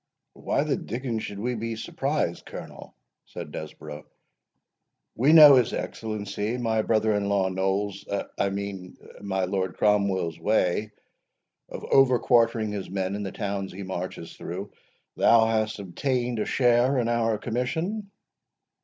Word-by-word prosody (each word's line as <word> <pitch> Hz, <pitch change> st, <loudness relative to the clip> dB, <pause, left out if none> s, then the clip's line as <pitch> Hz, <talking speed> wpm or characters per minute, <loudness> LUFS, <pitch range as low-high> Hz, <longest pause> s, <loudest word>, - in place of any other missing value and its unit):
"Why -, -, -1 dB
the -, -, 0 dB
dickens 120 Hz, -2 st, -4 dB
should 100 Hz, -, -6 dB
we 120 Hz, +5 st, -2 dB
be 115 Hz, 0 st, -3 dB
surprised, 135 Hz, -, -2 dB
Colonel?" -, -, -10 dB, 0.3 s
said -, -, -8 dB
Desborough; 75 Hz, 0 st, -8 dB, 1.1 s
"we 135 Hz, +6 st, +3 dB
know 155 Hz, -3 st, +10 dB
his 125 Hz, -3 st, +3 dB
Excellency, 110 Hz, +1 st, -3 dB
my 115 Hz, -2 st, +1 dB
brother 110 Hz, 0 st, +2 dB
in 100 Hz, -1 st, 0 dB
law 100 Hz, -2 st, +2 dB
Noll's—I 100 Hz, +1 st, -2 dB
mean 95 Hz, -2 st, -6 dB, 0.2 s
my 95 Hz, -2 st, -1 dB
Lord 95 Hz, -1 st, -2 dB
Cromwell's 100 Hz, -6 st, +1 dB
way, 105 Hz, +2 st, +1 dB, 0.8 s
of -, -, -8 dB
overquartering 120 Hz, -4 st, +3 dB
his 100 Hz, -2 st, -5 dB
men 95 Hz, 0 st, -2 dB
in 105 Hz, -, -3 dB
the 95 Hz, -2 st, -4 dB
towns 100 Hz, -2 st, -3 dB
he 100 Hz, +2 st, -7 dB
marches 90 Hz, -2 st, -6 dB
through. 95 Hz, +4 st, -6 dB, 0.5 s
Thou 115 Hz, -1 st, +5 dB
hast 110 Hz, -1 st, 0 dB
obtained 120 Hz, +5 st, -2 dB
a -, -, 0 dB
share 125 Hz, +1 st, +3 dB
in 120 Hz, -2 st, +1 dB
our 115 Hz, -2 st, +1 dB
commission?" 160 Hz, -, -3 dB
105 Hz, 135 wpm, -26 LUFS, 95-120 Hz, 1.1 s, know